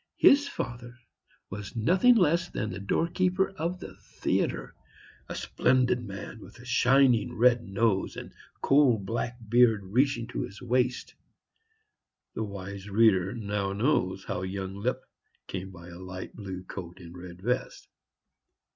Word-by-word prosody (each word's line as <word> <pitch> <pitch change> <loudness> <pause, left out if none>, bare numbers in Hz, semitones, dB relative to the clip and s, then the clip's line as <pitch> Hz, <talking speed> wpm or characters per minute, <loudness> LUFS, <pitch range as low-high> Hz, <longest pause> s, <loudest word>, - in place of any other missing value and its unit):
His 285 +1 +6
father 120 - -6 0.5
was 100 +4 -7
nothing 185 - +4
less 175 -3 +3
than 110 - -3
the 90 - -6
doorkeeper 180 - +1
of 180 -1 -3
the - - -9
theatre; - - -2 0.6
a - - -4
splendid 125 -1 +1
man 100 +1 -8
with - - -13
a 120 - -13
shining 125 -1 +3
red 120 +1 +5
nose 100 -1 0
and - - -8 0.3
coal 135 -4 +5
black 115 +4 -3
beard 115 -2 +4
reaching 120 +4 +1
to - - -3
his 100 - -7
waist. 125 0 0 1.2
The 110 - -3
wise 100 -1 -7
reader 100 -3 +3
now 100 -3 -2
knows 100 -5 0
how 90 - -3
young 95 0 -4
Lipp 115 +6 -2 0.4
came 95 0 -5
by 85 -2 -12
a 85 0 -10
light 95 0 -8
blue 95 -3 -7
coat 90 -1 -8
and 85 -1 -11
red 90 0 -10
vest. 125 +3 -2
110 Hz, 140 wpm, -28 LUFS, 95-125 Hz, 1.2 s, His